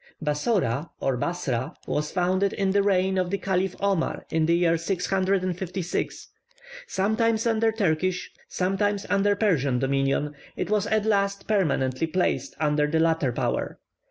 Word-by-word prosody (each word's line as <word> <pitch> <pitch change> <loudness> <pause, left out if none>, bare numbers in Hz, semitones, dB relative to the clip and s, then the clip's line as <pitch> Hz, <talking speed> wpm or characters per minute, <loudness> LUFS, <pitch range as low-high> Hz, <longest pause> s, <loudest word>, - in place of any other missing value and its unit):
Bassora, 150 - 0
or 135 - 0
Bassra, 140 -1 -2
was 150 0 -1
founded 185 +2 +1
in 195 -1 0
the 200 +1 +3
reign 190 -1 +2
of 180 -1 0
the 200 - 0
Caliph 190 -1 -1
Omar, 195 -4 0
in 160 -1 +2
the 170 - +4
year 170 -1 +3
656. 185 0 -1 0.6
Sometimes 220 +3 +1
under 225 -1 +2
Turkish, 185 -3 0 0.2
sometimes 200 +2 0
under 205 0 +3
Persian 150 - +1
dominion, 135 +2 0 0.2
it - - -3
was 210 -2 +2
at 215 -1 +1
last 200 -2 0
permanently 160 -8 +1
placed 180 +3 -1
under 150 -1 +2
the 160 +2 +1
latter 160 -5 +2
power. 120 - -2
185 Hz, 140 wpm, -25 LUFS, 155-200 Hz, 0.6 s, the